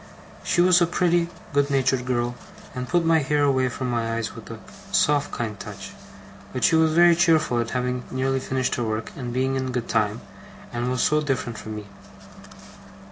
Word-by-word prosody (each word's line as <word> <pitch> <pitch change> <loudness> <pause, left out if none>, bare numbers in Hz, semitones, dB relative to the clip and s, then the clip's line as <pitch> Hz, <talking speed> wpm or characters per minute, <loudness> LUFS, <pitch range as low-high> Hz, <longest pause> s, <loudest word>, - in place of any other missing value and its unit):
She 175 - +2
was 180 0 +5
a 175 - +4
pretty, 175 -1 +2 0.3
good 145 0 +2
natured 130 -2 +1
girl, 120 -1 0 0.4
and 125 -1 -5
put 175 -1 +2
my 165 0 +4
hair 145 0 +1
away 130 -2 +2
from 125 +1 -4
my 115 -1 -1
eyes 115 -2 -3
with - - -11
a - - -7 0.3
soft, 145 -1 +2
kind 110 -4 -4
touch; - - -8 0.6
but - - -4
she - - +5
was 160 -1 +3
very 175 0 +6
cheerful 160 -8 +3
at 115 -1 -1
having 125 0 -2
nearly 135 +1 0
finished 130 0 -1
her 120 - -1
work 110 -1 -3
and 125 -3 -5
being 130 +2 0
in 130 -1 -2
good 125 -2 -3
time, - - 0 0.5
and 120 +1 -2
was 125 -1 0
so 150 0 +3
different 130 -6 -2
from 110 0 -7
me! 105 -1 -7
130 Hz, 190 wpm, -24 LUFS, 120-150 Hz, 0.6 s, very